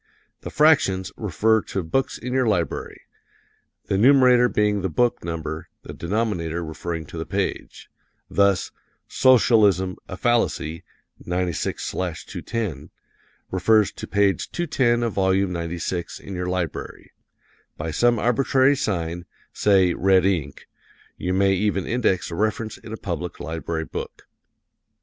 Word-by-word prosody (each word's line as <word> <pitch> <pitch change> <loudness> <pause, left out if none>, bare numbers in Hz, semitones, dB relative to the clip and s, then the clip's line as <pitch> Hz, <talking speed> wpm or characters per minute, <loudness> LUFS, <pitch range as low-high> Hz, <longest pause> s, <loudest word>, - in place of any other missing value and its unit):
The - - -7
fractions 100 -12 +3
refer 110 +2 +1
to 95 - -3
books 130 +12 -1
in 125 +1 -5
your 130 -2 +2
library 90 -8 -2 0.8
the 95 - 0
numerator 125 0 +6
being 105 -2 +1
the 95 - -1
book 120 +9 +1
number, 80 -2 -5
the - - -8
denominator 85 -4 -2
referring 80 +1 -5
to - - -8
the - - -4
page. - - -3 0.4
Thus, 100 -1 +2 0.4
"S. - - -5 0.3
a 95 -4 +2
fallacy, 95 -8 0 0.4
96/210," 90 - -3 0.6
refers 105 +3 +3
to - - -8
page 100 -1 +1
210 130 -8 +1
of 115 -3 -1
volume 95 -1 +1
96 85 +1 -4
in 100 - -9
your 90 0 -3
library. 90 -2 -4 0.7
By 80 +1 -4
some 120 +7 +3
arbitrary 130 +4 +3
sign 85 -8 -2 0.3
say 95 -4 +3
red 95 -1 +3
ink 80 -8 -2 0.5
you 90 - -3
may 95 +1 +3
even 95 0 0
index 115 -7 0
a - - -4
reference 110 +2 -2
in 110 - -11
a 110 - -5
public 90 -3 -5
library 80 0 -4
book. - - -7
95 Hz, 125 wpm, -23 LUFS, 85-110 Hz, 0.8 s, numerator